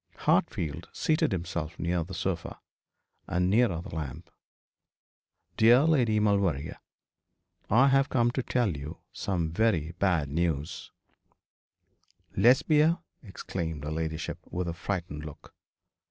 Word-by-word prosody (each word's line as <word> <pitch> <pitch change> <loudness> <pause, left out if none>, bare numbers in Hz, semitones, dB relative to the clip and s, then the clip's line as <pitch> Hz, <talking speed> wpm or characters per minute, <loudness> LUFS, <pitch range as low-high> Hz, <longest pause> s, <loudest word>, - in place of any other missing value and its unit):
Hartfield 75 -4 0
seated 155 -6 +1
himself 85 -3 -3
nearer 85 0 0
the 95 +3 -8
sofa, 85 0 -3 0.7
and 90 +1 +1
nearer 105 -7 +3
the - - -10
lamp. 80 +2 -6 1.3
'Dear 120 +5 +6
Lady 125 -9 +3
Maulevrier, 100 -9 0 0.9
I 130 +6 +5
have 135 +1 +3
come 120 -1 +2
to 130 - -1
tell 120 -8 0
you 75 +4 -7 0.2
some 85 -5 -2
very 85 -5 +1
bad 90 -7 +2
news 80 0 -2 0.7
' - - -38
'Lesbia?' 150 - +4 0.2
exclaimed 85 -7 -5
her 75 - -4
ladyship, 80 0 -3
with 90 0 -3
a 85 - -2
frightened 85 -4 -4
look. 75 -1 -11
90 Hz, 120 wpm, -28 LUFS, 80-115 Hz, 1.3 s, Dear